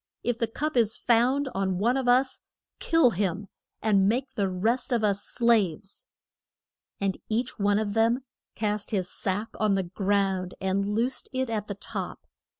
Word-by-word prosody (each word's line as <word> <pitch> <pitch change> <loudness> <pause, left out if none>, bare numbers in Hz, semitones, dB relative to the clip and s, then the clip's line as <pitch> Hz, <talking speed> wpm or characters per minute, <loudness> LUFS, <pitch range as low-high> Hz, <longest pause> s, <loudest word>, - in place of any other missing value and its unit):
If 240 -1 -1
the 230 - +1
cup 300 +7 -3
is 225 -3 +2
found 250 +4 +2
on 190 -1 0
one 235 +6 +2
of 265 -2 -1
us, 255 +2 +3 0.4
kill 325 -7 +4
him; 195 0 -2 0.3
and 200 -3 +4
make 255 +4 -1
the 200 -2 0
rest 225 +9 0
of 235 -3 +1
us 200 -1 +1
slaves. 205 -5 0 0.9
And 195 -1 -1
each 235 +2 -2
one 205 0 +3
of 210 -1 -1
them 230 +4 +2 0.3
cast 210 -1 -2
his 190 -5 -1
sack 205 +4 -2
on 210 -2 +3
the 190 - +1
ground, 190 0 0
and 195 +1 0
loosed 245 +4 -1
it 260 -2 -1
at 210 -2 -2
the 200 - -4
top. 200 - -5
215 Hz, 165 wpm, -27 LUFS, 195-240 Hz, 0.9 s, kill